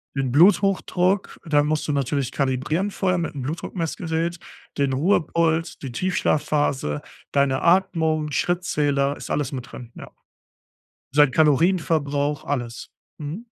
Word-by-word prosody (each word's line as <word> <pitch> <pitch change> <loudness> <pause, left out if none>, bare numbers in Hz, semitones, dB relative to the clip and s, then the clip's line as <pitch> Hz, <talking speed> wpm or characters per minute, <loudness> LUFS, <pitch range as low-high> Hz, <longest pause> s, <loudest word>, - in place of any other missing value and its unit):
Den 135 -2 -1
Bluthochdruck, 185 +2 +2
da 150 -3 +2
musst 150 +1 -1
du - - 0
natürlich 140 -1 -1
kalibrieren 150 +9 -1
vorher 185 -2 0
mit'm 160 -5 -3
Blutdruckmessgerät, 165 +2 -3 0.4
den 140 -2 +1
Ruhepuls, 165 +1 +1
die 135 -3 -6
Tiefschlafphase, 145 - 0 0.3
deine 140 -1 +1
Atmung, 160 -4 +2
Schrittzähler, 145 -5 0
ist - - -8
alles 145 -2 -1
mit 125 -3 -7
drin, 120 -2 -10
ja. - - -10 1.0
Sein 145 -2 +5
Kalorienverbrauch, 150 -2 +2
alles. 120 -4 -4 0.3
Mhm. 160 +11 -6
150 Hz, 115 wpm, -23 LUFS, 140-170 Hz, 1.0 s, Sein